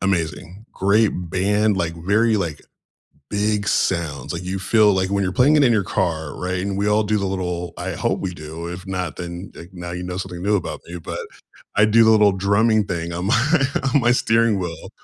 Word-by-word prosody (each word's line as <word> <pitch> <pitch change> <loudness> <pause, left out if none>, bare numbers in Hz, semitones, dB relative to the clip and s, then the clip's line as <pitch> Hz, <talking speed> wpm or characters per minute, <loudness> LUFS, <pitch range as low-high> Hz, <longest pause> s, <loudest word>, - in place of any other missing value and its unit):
Amazing. 90 +2 -2
Great 105 +3 +3 0.2
band, 105 +2 +1
like, 85 -2 -1
very, 105 +7 +2
like, 85 -7 -3 0.7
big 105 0 0
sounds, 80 -7 0
like, 85 - -5
you 95 +1 -3
feel, 105 +2 +4
like 95 0 0
when 100 0 0
you're 90 - -1
playing 135 +9 +4
it 145 - +5
in 120 - +4
your 105 -4 +2
car, 80 -3 -2
right, 90 0 -2
and 100 0 -3
we 100 +1 0
all 105 +1 +3
do 105 +1 0
the 100 - -1
little 90 -2 -3
I - - -4
hope - - -1
we 90 -2 -3
do, 80 +1 -8
if 90 +2 -7
not, 90 -3 -3
then, 85 +2 -7
like, 85 - -11
now 85 -1 -7
you 90 +1 -5
know 90 0 -5
something 90 -2 -6
new 105 +2 +2
about 95 - -3
me, 85 - -7
but - - -6 0.6
I 105 +1 +5
do 115 +2 +5
the 110 - +5
little 105 -2 +5
drumming 100 +3 +2
thing 85 -2 -4
on 85 +2 -3
my 115 +6 +3 0.6
on 145 - +4
my 120 - +3
steering 115 -4 +2
wheel, 85 -3 -6
95 Hz, 215 wpm, -21 LUFS, 85-105 Hz, 0.7 s, it